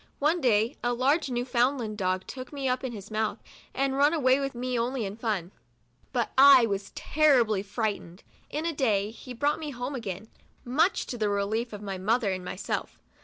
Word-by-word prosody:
One 320 +4 +1
day 230 0 +2
a 245 0 +1
large 275 +5 +2
Newfoundland 245 -2 0
dog 185 -2 -1
'took 255 -1 -8
me 280 -2 -3
up 255 +1 0
in 260 - -3
his 210 -2 -9
mouth, 215 0 -1 0.3
and 270 0 0
run 290 +4 +4
away 260 -3 +3
with 275 -2 -3
me 250 +1 -4
80 - - -2
MEMOIRS 240 - +1
OF - - +2
A 235 - +1
only 250 -3 -3
in 195 +1 -5
fun, 210 -6 -2 0.6
but - - -1
I 270 -3 +9
was 200 -2 -3
terribly 250 -10 +3
frightened. 205 -3 -4 0.3
In 305 +3 -3
a 335 - 0
day 215 -7 +1
he 250 +2 -10
brought 290 +6 +1
me 310 -2 -5
home 250 +1 -5
again, 210 -5 -5 0.4
much 305 +10 +2
to 245 - -6
the 210 -1 +1
relief 210 +4 -1
of 210 -1 -8
my 195 -2 -4
mother 215 +2 +1
and 185 -1 -4
my 180 - -5
self. 190 - -4
240 Hz, 215 wpm, -27 LUFS, 205-270 Hz, 0.6 s, I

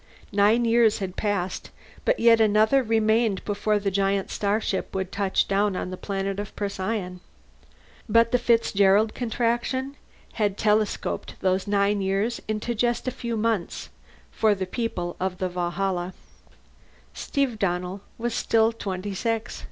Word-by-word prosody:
Nine 210 +4 +3
years 230 -2 +4
had 190 -3 -5
passed, 200 -3 -2 0.4
but - - +2
yet 230 -1 +6
another 215 +5 +4
remained 220 -2 +1
before 210 +1 0
the 200 -1 -1
giant 195 0 0
starship 205 -2 -1
would 190 -1 -2
touch 200 -1 +1
down 200 0 +1
on 180 - -4
a - - -3
planet 195 +1 -3
of 205 - -6
Procyon's. 190 -2 -3 0.9
But 230 +1 +4
the 250 - +3
Fitzgerald 215 -3 +3
Contraction 245 +3 -1 0.4
had 205 -3 0
telescoped 215 0 0
those 185 +1 +1
nine 200 0 +2
years 195 +5 -1
into 215 +2 -2
just 240 +2 0
a - - +1
few 235 -1 -4
months, 215 -5 -1 0.4
for 215 -2 +2
the 190 -1 -3
people 185 -4 -3
of 185 0 -2
the 185 0 -2
Valhalla. 180 +1 -2 1.0
Steve 265 -6 -2
Donnell 180 +1 -2 0.2
was 240 +1 -2
still 225 0 +2
twenty 200 -3 -5
six. 225 +3 -2
205 Hz, 140 wpm, -25 LUFS, 190-230 Hz, 1.0 s, yet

